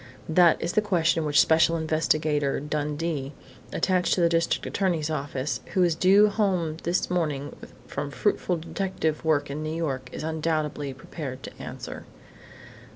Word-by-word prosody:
That 170 +1 +5
is 170 - -2
the 215 - +3
question 170 -6 +1
which 145 -2 +3
Special 160 +3 +4
Investigator 155 -2 +1
Dundee, 150 0 -3 0.4
attached 185 -1 +1
to 180 - 0
the 170 - +4
district 165 0 +1
attorney's 170 -6 0
office, 140 -2 -3
who 185 - +4
is 175 -2 +3
due 195 +5 +5
home 185 -7 0
this 175 +1 -1
morning 150 -5 -1 0.3
from 145 - -4
fruitful 180 +2 0
detective 165 -2 -2
work 145 -3 +1
in 150 +2 -4
New 155 +1 -3
York, 135 -6 -3
is - - -6
undoubtedly 155 -2 -1
prepared 135 -1 -7
to - - -7
answer." - - -7
160 Hz, 150 wpm, -26 LUFS, 150-175 Hz, 0.4 s, That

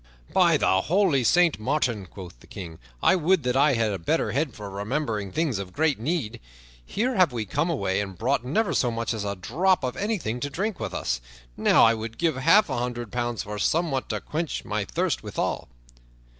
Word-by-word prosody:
"By - - +5
the 95 0 +2
holy 170 - +2
Saint 175 +4 +4
Martin," 120 -5 -1
quoth 90 -9 -11
the - - -18
King, 85 -4 -8 0.2
"I - - +5
would 180 0 +2
that 125 0 0
I 140 +1 +4
had 115 -2 +1
a 95 - -3
better 85 - 0
head 140 -2 -1
for 105 -1 -7
remembering 105 0 -3
things 150 - 0
of 95 -2 -7
great 155 -4 +1
need. 140 -2 -2 0.4
Here 240 - -1
have 180 -6 +5
we 115 -3 -3
come 145 - -1
away 100 - 0
and 95 -3 -6
brought 125 +6 0
never 185 - 0
so 125 - +2
much 115 0 -2
as 110 -2 -4
a 100 0 -2
drop 170 - +1
of 125 -1 -2
anything 195 - -2
to 145 - -3
drink 195 +7 -3
with - - -4
us. - - -2 0.3
Now - - +4
I 115 - +6
would 115 0 -6
give 165 -4 +1
half 205 +11 +5
a - - -2
hundred 120 -2 -4
pounds 120 -2 -2
for 105 0 -6
somewhat 155 - 0
to - - -1
quench 160 +1 -4
my 105 -1 -2
thirst - - -1
withal." - - -3
125 Hz, 205 wpm, -25 LUFS, 105-160 Hz, 0.4 s, I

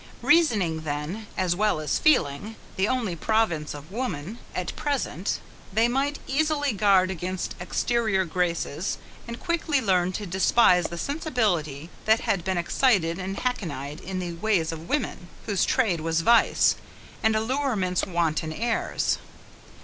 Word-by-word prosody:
Reasoning 215 - +3
then, 155 +8 -4
as 180 -2 +1
well 210 -4 +1
as 155 - 0
feeling, 210 - +2 0.2
the 190 +2 +1
only 230 -8 -1
province 170 -6 0
of 145 +4 -11
woman, 210 - -4 0.2
at 180 - -3
present, 265 - -1 0.3
they 220 +4 +3
might 275 +4 0
easily 290 -1 +1
guard 195 -2 +4
against 185 0 -3
exterior 210 +1 0
graces, 170 -1 -1 0.3
and 235 +1 -6
quickly 330 -4 0
learn 185 -6 +2
to 205 - -4
despise 185 0 +4
the 170 - -4
sensibility 180 - -1
that 220 +1 +4
had 185 -4 0
been 190 0 -1
excited 175 -2 +2
and 190 +1 -4
hackneyed 155 - -3
in 190 +1 -5
the 175 -2 -3
ways 170 -3 +1
of 165 +1 -8
women, 290 -11 -2 0.2
whose 200 -3 +1
trade 195 -11 +1
was 165 +1 0
vice; 235 +6 +4 0.4
and 220 0 +3
allurement's 220 -6 0
wanton 165 -4 0
airs. 230 +7 -1
190 Hz, 140 wpm, -26 LUFS, 170-235 Hz, 0.4 s, guard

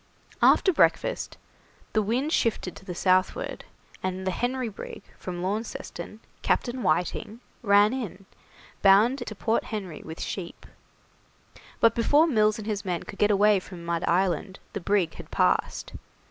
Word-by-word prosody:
After 380 - +5
breakfast - - +1 0.6
the 215 - +3
wind 245 +9 0
shifted 215 -5 0
to - - -12
the 180 -2 -6
southward, 185 - +1 0.4
and 185 0 -3
the 190 - +1
'Henry' 250 +4 -1
brig, 210 -1 -8 0.2
from 175 -1 -5
Launceston, 215 +2 -5 0.2
Captain 250 +1 0
Whiting, 210 +3 -1 0.2
ran 205 0 +5
in, 205 -7 -5 0.6
bound 210 +7 +5
to 235 -3 -6
Point 225 +3 0
Henry 195 -7 -5
with 160 +1 -8
sheep; 180 -4 -6 1.1
but 230 -1 +5
before 290 +7 +4
Mills 215 -8 +3
and 215 - -7
his 210 -2 -2
men 180 -4 -2
could 200 - -10
get 210 - +4
away 205 0 +4
from 180 -2 -10
Mud 170 -1 -1
Island 185 +1 0 0.2
the 200 - -3
brig 185 -3 +1
had - - -11
passed. - - 0
205 Hz, 145 wpm, -26 LUFS, 185-230 Hz, 1.1 s, After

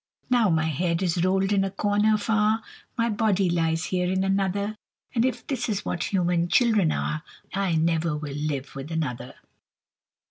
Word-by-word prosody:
Now 235 -5 +4
my 160 -2 +2
head 170 +3 0
is 175 -1 +1
rolled 190 +1 +2
in 195 -1 +3
a 195 - -1
corner 205 +2 +2
far, 215 +1 +1 0.3
My 230 0 +2
body 205 -4 +1
lies 165 -1 +1
here 180 -1 0
in 190 0 +1
another; 195 +2 0 0.4
And 235 -2 +2
if 245 -1 -1
this 250 -4 -2
is 205 -2 -2
what 170 - -2
human 175 -3 +1
children 215 -5 +3
are, 150 +1 -2 0.3
I 195 -3 0
never 160 -1 +1
will 150 -2 -5
live 145 -2 -3
with 135 +4 -7
another. 125 -7 -3
185 Hz, 170 wpm, -25 LUFS, 165-210 Hz, 0.4 s, Now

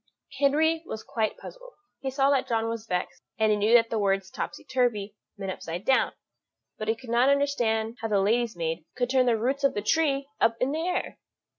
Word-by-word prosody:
Henry 315 +3 +3
was 220 - -6
quite 220 -2 -2
puzzled; - - -11 0.3
he 270 - -3
saw 270 +1 +2
that 275 -2 +1
John 225 -1 0
was 230 -1 -4
vexed, 180 -2 -3 0.2
and 220 -1 +3
he - - +4
knew 215 +3 +4
that 230 -1 +4
the 225 - 0
words 195 -1 0
topsy - - -5
turvy 220 -6 0 0.2
meant 195 -1 -4
upside 175 +1 -6
down; 265 -1 +3 0.7
but 215 - -4
he 225 - +2
could 230 0 -10
not 240 +3 +4
understand 240 -5 +1
how 225 - -1
the 205 -2 +2
lady's 225 +3 +1
maid 165 -1 -3
could 245 0 0
turn 260 -1 +3
the 235 -2 +3
roots 265 +5 -1
of 275 - +3
the 205 - -2
trees 280 +2 +1
up 225 0 +3
in 255 +2 +1
the 315 +2 -2
air. 360 - -2
230 Hz, 210 wpm, -27 LUFS, 215-275 Hz, 0.7 s, he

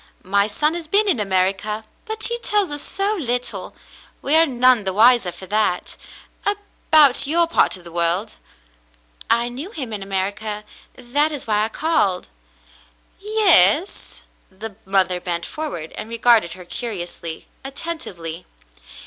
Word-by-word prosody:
My 200 +2 +2
son 300 +9 +1
has 340 -2 -6
been 410 +6 +3
in 360 - +2
America, 195 +2 0 0.2
but 440 0 -4
he 475 0 0
tells 415 -7 0
us 290 0 -2
so 400 +5 -1
little, 245 - -2 0.5
we 290 - +3
are 325 +1 +6
none 255 -3 +4
the 190 -1 -1
wiser 225 -2 +5
for 175 +2 -11
that, 210 -2 -1 0.5
about 315 -10 +3
your 340 +3 +3
part 335 - +2
of 180 - -16
the 170 - -11
world." 175 +5 -1 0.9
I 235 +1 +3
knew 265 +9 -7
him 265 - -6
in 205 - -4
America. 200 +2 -3 0.3
That 285 +5 0
is 290 -3 -5
why 215 -1 +1
I - - -4
called." 255 - 0 0.9
Yes.'^" 385 - +3 0.3
The 205 +2 -9
mother 190 -2 +1
bent 170 -1 -3
forward 290 - -6
and 215 - -8
regarded 230 -5 +3
her 180 -1 -12
curiously, 175 -7 -6 0.2
attentively. 230 - -6
230 Hz, 140 wpm, -21 LUFS, 190-315 Hz, 0.9 s, are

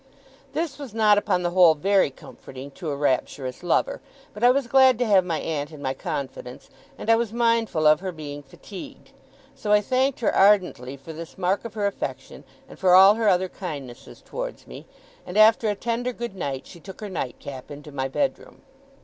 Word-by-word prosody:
This 310 -4 -3
was 265 -7 -9
not 210 -2 +5
upon 180 -3 -1
the 175 - 0
whole 175 -3 +6
very 195 +2 +2
comforting 135 0 -12
to 160 +3 -6
a 145 - -2
rapturous 130 -2 -2
lover; - - 0 0.3
but 210 - -8
I 245 - +7
was 270 +1 +2
glad 260 0 +5
to 245 - 0
have 200 -4 +4
my 165 -3 -2
aunt 150 -2 -3
in 155 - -11
my 135 -2 -2
confidence, 130 -2 -6 0.3
and - - -8
I 225 - +6
was 230 -2 -1
mindful 230 -8 +1
of 150 0 +6
her 190 0 -4
being 145 -3 -8
fatigued. 195 - -12 0.4
So 240 -6 -4
I 210 - +6
thanked 255 +5 0
her 220 - +1
ardently 180 -10 +3
for 150 +4 -10
this 165 +1 -10
mark 190 +4 0
of 230 - -8
her 210 -2 -1
affection, 200 - -5 0.2
and - - -14
for 180 -1 +5
all 195 +2 +9
her 220 -1 +1
other 185 0 +2
kindnesses 145 -10 -9
towards - - -6
me; - - -11 0.4
and 180 - -6
after 220 +1 +5
a 205 - 0
tender 240 +3 -2
good 235 -4 -6
night, 140 -7 -4
she 170 - -13
took 190 +3 -11
her 210 - -5
nightcap 135 -5 -6
into 145 +1 -10
my 135 -1 -2
bedroom. 275 - -3
190 Hz, 200 wpm, -24 LUFS, 145-230 Hz, 0.4 s, all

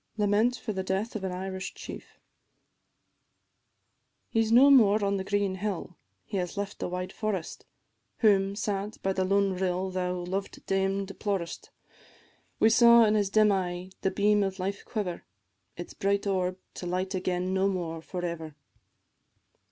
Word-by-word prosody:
LAMENT 210 +4 +2
FOR 220 -3 -5
THE 190 - -2
DEATH 190 +5 -2
OF 210 - -4
AN 190 - -2
IRISH 190 +1 -5
CHIEF. - - -10 2.1
He 225 - +2
's 220 0 0
no 265 +4 +7
more 215 -5 +5
on 200 0 +1
the 190 - -3
green 200 0 0
hill, 190 -2 -4 0.3
he 205 - -4
has 180 +2 -3
left 200 0 -4
the - - -3
wide 180 +1 -4
forest, 205 -6 -4 0.5
Whom, 200 -3 +3
sad 205 0 -3
by 195 - +1
the 190 - 0
lone 195 +1 +2
rill, 185 0 -1
thou, 180 -1 -1
loved 185 +2 -4
dame, 195 +1 0
deplorest: 195 -3 -4 0.9
We 220 - +5
saw 235 0 +7
in 210 - +3
his 205 -2 +1
dim 215 0 +4
eye 180 -1 -2
the 190 - +2
beam 205 +2 +2
of 195 -1 -1
life 195 +2 -3
quiver, 195 -6 -4 0.5
Its 175 - -7
bright 200 +1 0
orb 185 -2 0 0.2
to 180 - -6
light 185 +2 -2
again 185 0 -1
no 190 +1 +2
more 170 -4 -3
for 180 +1 -5
ever. 160 -3 -5
195 Hz, 160 wpm, -28 LUFS, 185-205 Hz, 2.1 s, no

